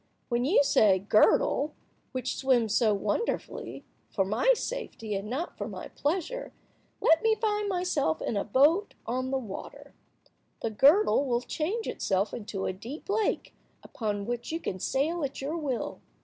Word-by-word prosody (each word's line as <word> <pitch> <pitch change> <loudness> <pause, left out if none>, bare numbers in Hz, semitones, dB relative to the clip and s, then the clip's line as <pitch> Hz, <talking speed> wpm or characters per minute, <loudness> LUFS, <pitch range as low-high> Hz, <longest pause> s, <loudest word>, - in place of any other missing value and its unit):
When 240 0 +1
you 295 +1 +5
say, 210 -8 +5
'Girdle, 215 +8 +3 0.4
which 255 -1 -3
swims 240 -5 +2
so 220 -1 +4
wonderfully, 205 - -2 0.2
for 195 - 0
my 220 - +3
safety 460 - -5
and 200 +1 -3
not 295 +9 -3
for - - -3
my - - -7
pleasure, 380 +12 -2 0.5
let 325 0 +4
me 445 0 +3
find 420 -1 0
myself 355 - 0
in - - -2
a 200 - +1
boat 295 - +3
on 255 +2 -2
the 270 - 0
water,' 220 -7 -8 0.7
the 225 - 0
girdle 285 - +5
will 240 -1 +1
change 365 - -3
itself 195 +1 0
into 205 -4 -4
a - - -1
deep 240 - -9
lake, 430 0 0 0.3
upon 205 -4 -3
which 240 +4 -4
you 325 - -2
can 185 - -4
sail 310 - 0
at 275 -1 -3
your 285 +4 -3
will." 285 -7 -3
265 Hz, 160 wpm, -28 LUFS, 215-335 Hz, 0.7 s, you